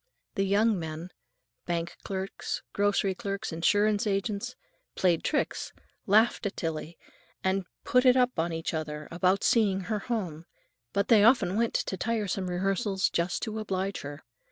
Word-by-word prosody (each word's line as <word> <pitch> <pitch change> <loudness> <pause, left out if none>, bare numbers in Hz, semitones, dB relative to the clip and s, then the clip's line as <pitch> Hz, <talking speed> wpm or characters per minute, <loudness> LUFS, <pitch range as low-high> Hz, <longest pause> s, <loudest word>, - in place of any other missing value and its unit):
The 195 - 0
young 205 +1 +3
men—bank 170 +1 -6
clerks, 190 0 -4
grocery 200 -1 +2
clerks, 200 -1 -4
insurance 205 +5 +2
agents—played 195 - -2
tricks, 300 - -1 0.3
laughed 215 +1 +4
at 195 - -7
Tillie, 160 0 -4 0.5
and 190 -1 0 0.2
"put 250 +1 +3
it 250 0 +6
up 250 -6 +2
on 170 +1 0
each 165 0 -3
other" 150 -1 -4
about 185 +3 +2
seeing 200 -5 +3
her 210 +3 -2
home; 180 -9 -4 0.4
but 200 - 0
they 215 -3 +7
often 225 -5 +4
went 230 +1 +1
to 190 - -1
tiresome 200 -3 -1
rehearsals 195 +2 0
just 170 -1 -1
to 220 0 -3
oblige 195 -2 -2
her. 145 +1 -8
195 Hz, 140 wpm, -28 LUFS, 175-215 Hz, 0.5 s, they